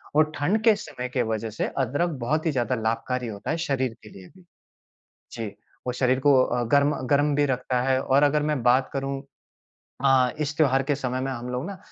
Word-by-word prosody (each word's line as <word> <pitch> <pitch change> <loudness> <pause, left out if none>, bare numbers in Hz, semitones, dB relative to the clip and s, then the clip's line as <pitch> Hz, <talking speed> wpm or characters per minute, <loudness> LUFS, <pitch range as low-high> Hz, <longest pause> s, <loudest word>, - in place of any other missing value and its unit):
और 155 0 +4
ठंड 190 +9 +1
के 225 -2 +6
समय 125 -11 -6
के 125 0 0
वजह 110 0 -2
से 105 - -2
अदरक 140 +6 0
बहुत 155 +7 -1
ही 160 - +2
ज़्यादा 125 -2 0
लाभकारी 120 +2 -2
होता 100 -3 -5
है 160 - -1
शरीर 130 -6 -1
के 105 - -12
लिए 95 -3 -13
भी। 185 - -18 0.9
जी। 115 -2 -4 0.4
वो 125 - 0
शरीर 130 +1 +1
को 145 +1 +5
अ, 120 0 -1
गर्म 140 +1 +4
गर्म 145 +2 +2
भी 145 +1 +3
रखता 125 -1 -1
है। 130 0 +2
और 135 +1 +2
अगर 145 +1 +3
मैं 150 -4 -1
बात 125 +2 +3
करूँ 135 0 -3 0.8
अ, 130 -2 +4
इस 150 0 -2
त्योहार 135 -4 +3
के 145 +2 0
समय 130 -2 -3
में 135 +1 -2
हम 120 0 -6
लोग 125 +2 -3
ना 200 -2 -7
135 Hz, 210 wpm, -25 LUFS, 125-145 Hz, 0.9 s, के